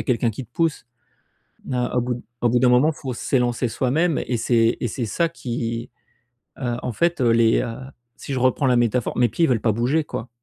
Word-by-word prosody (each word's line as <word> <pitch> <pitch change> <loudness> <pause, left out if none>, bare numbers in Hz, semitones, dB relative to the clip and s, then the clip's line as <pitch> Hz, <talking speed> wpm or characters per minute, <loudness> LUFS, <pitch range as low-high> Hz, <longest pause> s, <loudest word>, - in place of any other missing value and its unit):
a - - -4
quelqu'un 120 -2 +1
qui 125 +5 -7
te 120 - -47
pousse. 165 -7 -1 0.8
Na 125 -2 -2
au - - +4
bout 125 0 -1
d 120 - -9 0.2
au 120 - +4
bout 125 - +3
d'un 125 - +4
moment, 140 +6 +4
faut 130 -5 -6
s'élancer 120 0 0
soi-même 140 +8 0
et 125 - -1
c'est 115 0 +2
et 120 - -1
c'est 120 +1 -3
ça 170 +10 0
qui, 115 -5 -4 0.7
heu, 120 -3 -2
en 125 - -2
fait, 170 -1 0
heu, 120 - +3
les 115 -1 +4
heu, 115 -2 -4 0.4
si 140 - -6
je 130 - -1
reprends 130 +3 +2
la 125 -1 +4
métaphore, 120 0 0
mes 120 -2 +3
pieds 165 +9 +1
veulent 120 -4 +2
pas 110 -3 +2
bouger, 130 +8 +1
quoi. 115 +3 -6
125 Hz, 225 wpm, -22 LUFS, 115-135 Hz, 0.8 s, au